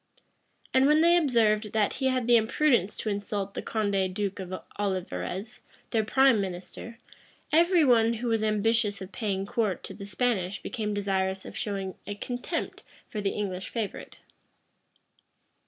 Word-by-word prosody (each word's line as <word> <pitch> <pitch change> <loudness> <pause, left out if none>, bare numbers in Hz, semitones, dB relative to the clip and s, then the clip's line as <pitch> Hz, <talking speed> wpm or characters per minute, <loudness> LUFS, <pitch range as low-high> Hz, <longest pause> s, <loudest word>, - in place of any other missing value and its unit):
And 260 +1 +5
when 305 +1 +5
they 340 +1 +6
observed, 225 - +2
that 215 -2 +2
he 265 - +3
had 255 -2 +1
the 240 0 +5
imprudence 230 -2 +2
to 220 - -3
insult 200 -1 -2
the - - -4
Condé 200 -4 0
duke 200 +1 -3
of 185 -1 -6 0.3
Olivarez, 190 - -3 0.3
their 220 -1 +2
prime 260 0 +4
minister, 190 +5 -7 0.5
every 340 +1 +5
one 230 -3 +4
who 240 +2 -4
was 225 -2 +1
ambitious 215 -1 +1
of 190 0 -8
paying 195 -4 -2
court 215 -4 -1
to - - -7
the 200 -2 -9
Spanish 205 -2 -1
became 210 -4 -3
desirous 190 -1 -1
of - - -9
showing 195 -3 -3
a 205 - -4
contempt 245 +4 -4 0.3
for 210 - -3
the 200 - +1
English 190 -3 -3
favorite. 225 -4 -5
210 Hz, 155 wpm, -28 LUFS, 195-235 Hz, 0.5 s, they